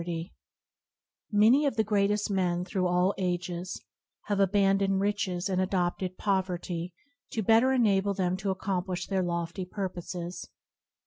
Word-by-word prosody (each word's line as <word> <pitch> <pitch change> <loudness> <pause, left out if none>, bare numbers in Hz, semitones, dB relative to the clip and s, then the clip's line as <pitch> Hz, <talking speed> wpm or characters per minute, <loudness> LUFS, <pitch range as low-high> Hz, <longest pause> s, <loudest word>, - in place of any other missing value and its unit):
MANY 230 +8 +5
of 275 - -1
the 220 - +2
greatest 205 0 +1
men 180 -2 0
through 185 -1 0
all 180 +2 +2
ages 180 -1 -2 0.4
have 205 -1 -1
abandoned 195 0 +3
riches 195 -3 -1
and 185 -1 0
adopted 185 -1 -1
poverty 180 -3 -1 0.4
to 220 - -1
better 225 +6 +5
enable 200 -6 +2
them 185 -2 0
to 195 +1 -3
accomplish 185 -1 -2
their 190 -1 0
lofty 170 +1 -2
purposes. 180 -2 -5
190 Hz, 125 wpm, -29 LUFS, 180-205 Hz, 0.4 s, MANY